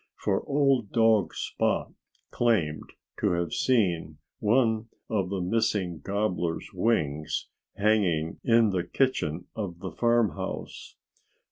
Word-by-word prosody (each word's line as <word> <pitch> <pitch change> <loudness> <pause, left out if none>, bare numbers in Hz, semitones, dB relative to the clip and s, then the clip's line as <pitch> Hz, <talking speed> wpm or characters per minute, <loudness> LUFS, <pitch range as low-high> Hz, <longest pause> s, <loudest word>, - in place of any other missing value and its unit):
For 95 -2 0
old 135 -6 +2
dog 110 -7 +3
Spot - - -1 0.4
claimed 95 -11 0 0.3
to - - +2
have 85 -1 -1
seen 100 -10 +1 0.2
one 110 0 +2 0.2
of 100 -4 0
the 95 -1 -2
missing 95 -3 0
gobbler's 90 -4 -2
wings 75 -10 0 0.3
hanging 95 -7 +1
in 115 -4 +4
the 90 -2 0
kitchen 90 - 0
of 100 -6 -4
the 90 +1 -6
farmhouse. 120 +1 -1
100 Hz, 110 wpm, -27 LUFS, 85-115 Hz, 0.4 s, in